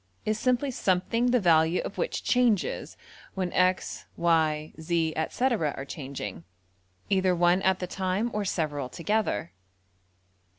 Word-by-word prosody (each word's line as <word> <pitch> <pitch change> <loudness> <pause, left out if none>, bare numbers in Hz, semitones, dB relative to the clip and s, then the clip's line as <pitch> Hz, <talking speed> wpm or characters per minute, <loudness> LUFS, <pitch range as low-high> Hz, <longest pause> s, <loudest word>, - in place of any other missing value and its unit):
is 215 0 0
simply 255 +3 +1
something 230 +3 +1
the 250 0 +4
value 165 -2 +4
of - - -6
which - - -2
changes 245 -6 +1 0.4
when 185 -2 -2
$x$,~$y$, 165 -4 +1
$z$,~etc., 165 - 0
are 135 - -5
changing, 130 - -6 0.7
either 190 -2 +3
one 175 +2 +3
at 190 -1 +2
the 180 - -3
time 190 +5 -1
or 210 - -1
several 150 -8 -2
together. 170 - -1
180 Hz, 120 wpm, -27 LUFS, 160-210 Hz, 0.7 s, the